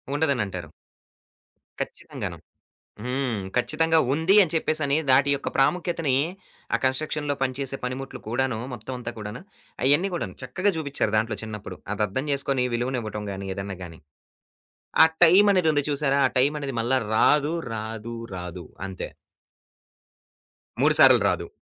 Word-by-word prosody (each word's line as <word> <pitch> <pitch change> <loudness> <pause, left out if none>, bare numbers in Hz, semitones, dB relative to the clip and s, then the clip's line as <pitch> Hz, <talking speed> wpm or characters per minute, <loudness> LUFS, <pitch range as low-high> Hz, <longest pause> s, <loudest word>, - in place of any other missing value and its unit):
ఉండదనంటారు. 105 - -1 1.1
ఖచ్చితంగాను. - - -6 0.7
హ్మ్. 125 -4 -2
ఖచ్చితంగా 160 +5 +2
ఉంది 160 +6 +3
అని 160 - -3
చెప్పేసని 155 -2 +1
దాటి 135 +2 +5
యొక్క 140 - -4
ప్రాముఖ్యతని 165 -1 +1 0.6
ఆ - - +4
కన్‌స్ట్రక్షన్‌లో 145 +2 0
పని 130 -1 +1
చేసే 135 0 -2
పనిముట్లు 130 +2 -5
కూడాను 125 +1 0 0.2
మొత్తం 125 +2 -7
అంతా 120 - -5
కూడాను 105 +2 -7 0.4
అయన్ని 145 +9 +4
కూడాను 100 - -4
చక్కగా 185 +11 0
చూబిచ్చారు 140 -8 -1
దాంట్లో 110 -1 -1
చిన్నప్పుడు 105 -2 -7 0.2
అదర్ధం 105 +6 -1
చేసుకొని 135 -2 0
విలువనివ్వటం 120 -4 -3
గాని 95 0 -6
ఏదన్నా 100 0 -5
గాని, 85 -2 -10 1.0
ఆ - - +11 0.2
టైమనేది 185 -1 +6
ఉంది 145 -1 +2
చూసారా? 140 -1 +1
ఆ - - +2
టైమనేది 140 0 +1
మళ్ళా 125 +3 +2 0.2
రాదు, 150 +6 +4 0.2
రాదు, 110 +1 -5 0.2
రాదు. 90 -1 -6 0.2
అంతే. 95 -1 -6 1.7
3 - - +5
సార్లు - - +8
రాదు. - - -2
130 Hz, 125 wpm, -25 LUFS, 110-150 Hz, 1.7 s, ఆ